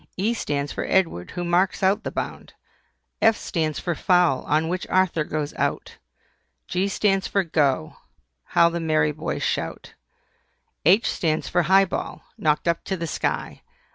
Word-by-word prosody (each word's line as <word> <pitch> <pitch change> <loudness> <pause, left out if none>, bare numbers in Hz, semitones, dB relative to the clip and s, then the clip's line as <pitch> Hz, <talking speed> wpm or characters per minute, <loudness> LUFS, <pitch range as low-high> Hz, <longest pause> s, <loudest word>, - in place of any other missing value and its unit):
E 210 +5 +1
stands 145 -9 -2
for - - -3
EDWARD, 165 - 0
who 175 - -2
marks 180 +3 +1
out 200 +4 +2
the - - -3
bound. - - -6 0.7
F 225 0 +5
stands 155 -5 -2
for 175 - -2
FOUL 175 -6 +2
on 155 +3 +1
which 180 +2 -3
Arthur 185 -4 +2
goes 150 -1 -3
out. - - -2 0.7
G 185 +2 0
stands 195 -1 +1
for 200 - +1
"GO" 145 - 0 0.5
How 170 - +4
the 170 0 -3
merry 155 -2 +1
boys 150 - -4
shout! - - -3 0.9
H 195 +7 +5
stands 155 -2 -1
for 175 - +2
HIGH 190 +4 +5
BALL, - - -5
knocked 150 +1 0
up 170 0 +1
to 190 - -2
the 170 - -3
sky. 160 - -3
170 Hz, 160 wpm, -24 LUFS, 155-190 Hz, 0.9 s, F